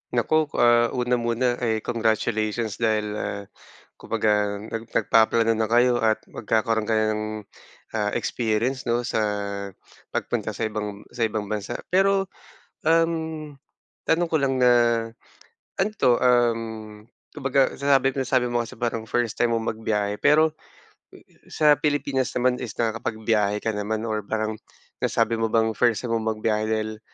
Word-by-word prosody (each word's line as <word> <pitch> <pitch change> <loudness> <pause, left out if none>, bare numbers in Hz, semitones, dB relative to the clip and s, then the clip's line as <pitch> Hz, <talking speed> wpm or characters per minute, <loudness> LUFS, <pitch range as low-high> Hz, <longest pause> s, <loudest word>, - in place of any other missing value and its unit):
Naku, 155 +6 +2
ah, 120 0 +5
una 125 0 +1
muna 120 +1 0
ay 110 -3 -1
congratulations 110 -1 -1
dahil, 110 -2 +1
ah, 100 - -4 0.6
kumbaga 105 -1 0
nag 115 0 -5
nagpaplano 115 +1 +3
na 110 - +1
kayo 120 +2 +4
at 110 -1 +1
magkakaroon 110 0 0
ka 110 - +1
na 110 - +2
ng, 110 0 -2 0.7
ah, 105 -2 -1
experience 120 +3 -1
'no, 120 +1 +1
sa 120 - -1 1.0
pagpunta - - -2
sa - - -3
ibang 105 -2 -4
sa 120 -2 0
ibang 105 -1 -4
bansa. 105 -2 -3 0.2
Pero, 195 +1 +2 0.5
um, 160 -2 0 0.5
tanong 170 +2 +1
ko 165 - 0
lang 135 -1 +1
na, 125 -1 +5 1.1
ano 200 +3 +2
'to, 125 -8 +3
uhm, 115 -3 0 0.2
kumbaga 135 -2 +1
sinabi 135 -1 +2
ko 135 - -3
nasabi 130 -1 +1
mo 120 - +1
kasi 115 -1 -6
parang 115 -1 -3
first 120 -2 -1
time 115 -1 +3
mong 115 0 -1
magbiyahe, 105 -2 -2
pero 155 +1 +4 1.0
sa 150 -1 +4
Pilipinas 145 -3 0
naman 125 0 +1
is 125 - -6
nakakapagbiyahe 110 -2 -1
ka 110 - +1
naman 110 +2 -3
or 110 -1 -1
parang 110 0 -2 0.4
nasabi 115 0 +1
mo 115 - +1
bang 110 0 +2
first 115 +1 +1
time 115 - -2
mong 110 -1 -1
magbiyahe 110 0 0
dahil, 110 0 -2
115 Hz, 145 wpm, -24 LUFS, 110-125 Hz, 1.1 s, ah